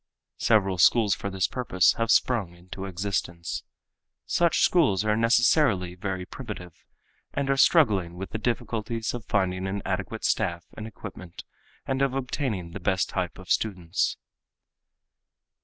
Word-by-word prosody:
Several 95 -5 +2
schools 105 +5 +5
for 100 - -4
this 95 -1 0
purpose 100 -8 +2
have 115 0 0
sprung 115 -6 +2
into 90 +2 -8
existence. 95 -2 -3 0.6
Such 170 -2 +2
schools 110 - +3
are 105 0 +2
necessarily 115 - +3
very 90 0 -4
primitive 100 - -8 0.6
and 140 -1 0
are - - +3
struggling 105 - +4
with 95 +2 -7
the 110 - -3
difficulties 115 -1 -2
of 120 -2 -6
finding 95 -2 0
an 100 +1 -3
adequate 100 +4 -3
staff 85 -5 0
and 110 - -6
equipment 95 -5 -10 0.4
and 135 0 -1
of 135 -1 +1
obtaining 125 - -2
the 100 - -7
best 95 +1 0
type 90 -3 -3
of 95 -1 -9
students. 90 -5 0
100 Hz, 140 wpm, -26 LUFS, 90-115 Hz, 0.6 s, schools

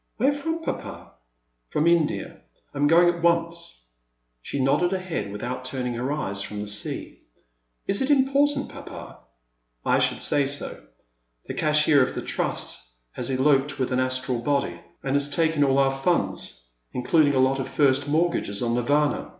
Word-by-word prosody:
Where 270 +6 +3
fi"om. 325 +3 -3
Papa? - - -6 0.3
" - - -49
From 150 - 0
India. 170 -3 +1 0.3
I - - -7
'm 145 - +4
going 170 +3 +6
at 175 -1 0
once." 170 - 0 0.6
She 140 - -4
nodded 145 +7 +2
her - - +1
head, 165 - -4
without 120 +5 -5
turning 130 -1 -3
her 125 +4 -2
eyes 100 -10 -2
from 105 +1 -5
the 105 - -4
sea. 105 0 -3 0.6
Is 200 - 0
it 265 - 0
important, 280 +1 +2
papa? - - -10 0.3
" - - -46
I - - +3
should - - +1
say 140 -2 +2
so. 145 - -5 0.6
The - - -5
cashier 150 -1 +4
of 130 - 0
the - - -4
Trust - - -3 0.3
has 125 - -4
eloped 135 +2 +2
with 130 -2 -1
an 125 - +1
Astral 130 -1 0
body, 140 +4 -1 0.2
and 135 0 -1
has 145 0 +1
taken 160 -1 +2
all 135 -1 +3
our 135 -1 +4
fiinds, 95 - -1 0.3
including 145 +3 +3
a - - +3
lot 130 +1 +3
of 135 - -3
first 140 -1 +2
mortgages 150 -9 0
on 115 -1 0
Nirvana. 145 +5 +1
140 Hz, 175 wpm, -25 LUFS, 125-165 Hz, 0.6 s, going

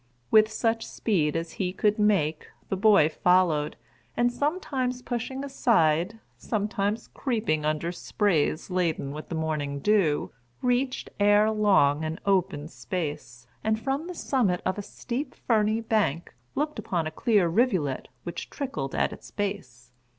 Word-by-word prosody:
With 215 0 +6
such 225 -1 0
speed 160 -9 0
as 165 0 -2
he 180 -1 0
could 210 +3 +1
make, 185 -8 +2 0.2
the - - 0
boy 200 -5 +5
followed, 165 -2 +2 0.4
and 240 0 +2
sometimes 260 -4 -1
pushing 255 +2 -3
aside, 210 - +2 0.2
sometimes 210 0 -1
creeping 215 - -1
under 155 +2 0
sprays 175 -3 0
laden 170 -6 0
with 155 +2 -8
the 170 - -3
morning 155 -3 -2
dew, 170 -2 +2 0.3
reached, 250 +1 0
ere 205 +1 +5
long, 190 -9 +3
an 160 +3 -3
open 180 -7 +1
space, 150 -9 -5 0.2
and 220 0 +1
from 270 +6 -2
the 360 - -6
summit 220 - 0
of 185 +2 -1
a - - -1
steep, 245 +7 -5
ferny 220 -1 +1
bank, 210 -8 0 0.2
looked 300 -2 -1
upon 175 -6 -1
a 155 - -3
clear 205 +1 +2
rivulet 175 - +1 0.2
which 175 - -6
trickled 150 - -4
at - - +1
its - - -12
base. 135 - -5
200 Hz, 145 wpm, -27 LUFS, 155-225 Hz, 0.4 s, With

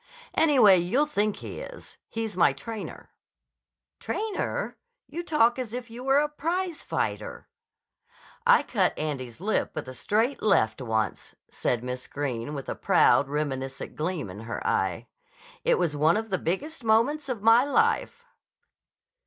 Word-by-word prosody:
"Anyway, 245 - +6
you'll 235 +13 +2
think 215 -8 0
he - - -7
is. - - -10
He's 225 -3 -4
my 170 -6 +4
trainer." 215 +10 -8 0.9
"Trainer! 440 +3 -3 0.3
You 335 - -5
talk 260 -8 +2
as 240 -3 -5
if 245 -2 -6
you 240 +2 -8
were 270 +1 +3
a 295 +1 +3
prizefighter." 335 +3 -3 1.0
"I 480 0 +6
cut 190 -7 +1
Andy's 135 -6 -4
lip 210 +4 -1
with 155 - -4
a 130 - -7
straight 220 - 0
left 135 - +2
once," 110 -3 -2 0.2
said 120 -1 -1
Miss 125 0 -5
Greene 140 -1 -3
with 135 - -6
a - - -2
proud, 140 - +4
reminiscent 135 -2 -3
gleam 155 - -3
in 100 - -9
her 115 +1 -6
eye. - - 0 0.6
"It 485 0 +3
was 150 - 0
one 155 +5 +3
of 220 -1 -4
the 185 - +1
biggest 280 - -3
moments 260 +7 +2
of 230 -5 -3
my 225 +2 +7
life." 455 - +1
215 Hz, 145 wpm, -27 LUFS, -, 1.0 s, my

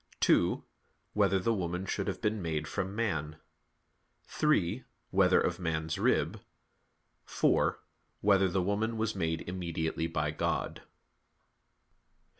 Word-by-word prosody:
(2) - - +3 0.5
Whether 100 -2 +3
the 105 +5 +1
woman 90 -2 -2
should 100 +1 -2
have 95 - -3
been 105 -1 0
made 80 -3 -2
from 95 +3 -3
man? 80 -9 -1 0.9
(3) 130 - +1 0.3
Whether - - +5
of - - 0
man's 80 -2 -2
rib? - - +1 0.8
(4) - - +2 0.4
Whether 100 -2 +4
the 90 +1 0
woman 110 +4 0
was 110 0 0
made 80 -3 -1
immediately 85 -3 -2
by 75 -2 -1
God? 75 - -2
95 Hz, 115 wpm, -31 LUFS, 80-105 Hz, 0.9 s, Whether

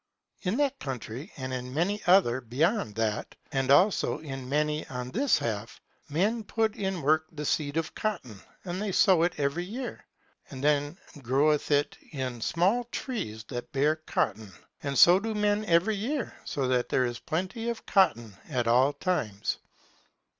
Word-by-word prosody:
In 195 +4 -1
that 280 -1 +1
country 130 - -6
and 130 -1 -4
in 125 +1 -5
many 200 +6 0
other 175 -10 +5
beyond 125 - 0
that, 110 -1 -2 0.2
and 135 -1 0
also 180 +9 +4
in 135 -4 -7
many 150 +1 0
on 125 -1 -5
this 265 +6 +3
half, 110 -1 -4 0.3
men 205 +10 +1
put 220 +1 0
in 190 -5 -2
work 155 +2 +3
the 150 -1 -6
seed 145 +1 0
of 165 -1 -2
cotton, 130 - -4 0.2
and 180 +1 -3
they 210 -2 -1
sow 185 -2 +5
it 175 +1 +2
every 145 +4 0
year. 240 +7 -6 0.5
And 135 -1 -8
then 145 +2 +1 0.2
groweth 140 +4 +2
it 145 0 +1
in 130 -4 -4
small 195 - +2
trees, 205 - -5
that 120 -2 -6
bear 145 +3 +3
cotton. 110 -9 -2 0.3
And 140 -1 -2
so 175 +8 +8
do 220 +1 -3
men 210 0 +1
every 180 +5 +3
year, 255 +5 -3
so 135 -3 -1
that 125 -1 +1
there 130 - +2
is 120 -1 -4
plenty 185 +8 -3
of 235 - -5
cotton 120 - +2
at 125 -5 0
all 130 +5 +4
times. 110 - -2
150 Hz, 165 wpm, -28 LUFS, 130-195 Hz, 0.5 s, so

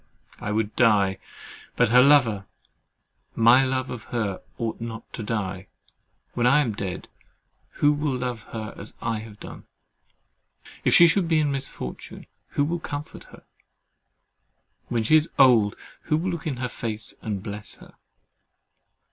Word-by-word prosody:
I 105 - -4
would 110 0 -1
die; 100 -5 +3 0.6
but - - +3
her 125 +2 +7
lover—my 120 -1 +2
love 130 0 -1
of 120 -3 -7
her—ought 115 +1 -4
not 115 -1 -7
to - - -5
die. 100 -3 -3 0.7
When 120 0 +1
I 145 +4 +5
am 120 -7 -1
dead, 95 -2 -5 0.7
who 145 0 +3
will 145 -3 -1
love 125 -3 -3
her 110 -2 -5
as 100 - -9
I 115 -2 -2
have 105 -1 -11
done? - - -10 1.2
If - - +4
she 170 - +9
should 175 +1 +2
be 165 -1 +3
in 150 -2 +2
misfortune, 135 - -6 0.2
who 145 - 0
will 170 +3 -2
comfort 145 -2 -7
her? - - -16 1.4
when 115 -2 0
she 155 +8 +5
is 155 +1 0
old, 120 -7 +5 0.3
who 155 - +2
will 180 +4 -1
look 170 -2 -5
in 135 -5 -2
her 125 0 -2
face, 110 -2 -5
and 105 -4 -4
bless 105 0 -4
her? - - -16
120 Hz, 145 wpm, -25 LUFS, 105-140 Hz, 1.4 s, she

